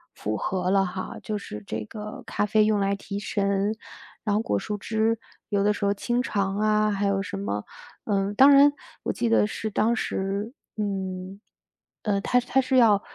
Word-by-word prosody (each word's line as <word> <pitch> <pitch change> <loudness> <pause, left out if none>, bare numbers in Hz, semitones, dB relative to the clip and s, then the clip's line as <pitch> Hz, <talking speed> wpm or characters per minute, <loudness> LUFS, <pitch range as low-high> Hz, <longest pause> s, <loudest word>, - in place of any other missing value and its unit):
符 105 +1 -3
合 185 - -1
了 195 0 +4
哈， 185 +1 -5
就 215 -1 -2
是 105 - -7
这 110 +2 -4
个 210 - -8
咖 - - -1
啡 215 +1 +3
用 210 -1 +2
来 195 0 +1
提 200 0 -6
神， 200 0 0 0.5
然 205 -2 +2
后 215 - +2
果 100 - 0
蔬 210 - -4
汁， 220 +2 0 0.3
有 200 -1 +1
的 210 - +4
时 205 - -2
候 200 - +3
清 240 +4 -1
肠 200 -5 -1
啊， 215 0 +2
还 200 0 0
有 195 0 +1
什 195 0 -5
么 105 - -3 0.4
嗯， 200 -1 0
当 270 +6 +8
然， 285 +1 +7 0.3
我 - - -1
记 235 - 0
得 225 -2 +4
是 220 +1 -4
当 220 +3 +2
时 200 0 -2 0.3
嗯， 190 -2 -3 0.6
呃， 205 -3 +1
它 250 +5 +2
是 245 - -14
它 265 - +3
是 265 0 +1
要 215 -5 +6
205 Hz, 210 characters per minute, -26 LUFS, 195-220 Hz, 0.6 s, 当